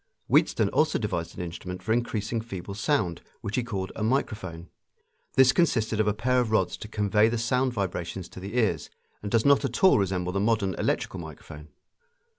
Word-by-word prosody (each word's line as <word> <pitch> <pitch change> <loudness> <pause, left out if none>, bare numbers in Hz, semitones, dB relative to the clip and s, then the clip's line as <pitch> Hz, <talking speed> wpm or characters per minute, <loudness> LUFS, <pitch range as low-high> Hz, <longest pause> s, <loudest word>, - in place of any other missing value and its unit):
Wheatstone - - +3
also - - +2
devised - - -3
an - - -3
instrument 90 +2 -7
for 110 - +1
increasing 115 -1 -1
feeble 100 -4 -7
sound, 100 - 0 0.2
which 100 - -3
he 125 - +2
called 95 -6 -4
a - - -6
microphone. 105 -8 -2 0.7
This 130 -1 +7
consisted 115 -9 +1
of 110 - +2
a 105 - +3
pair 125 +3 +2
of 120 -3 0
rods 110 - +1
to - - -8
convey 105 +1 +2
the 120 - -1
sound 125 +3 +1
vibrations 95 -4 -3
to - - -10
the 100 +6 -5
ears, 90 -11 +1 0.3
and 100 - -4
does 115 -2 +2
not 140 0 +5
at 130 +2 -3
all 190 - +7
resemble 90 -2 -1
the 100 - -1
modern 105 -2 +1
electrical 95 - -1
microphone. 75 -1 -10
105 Hz, 190 wpm, -27 LUFS, 95-120 Hz, 0.7 s, This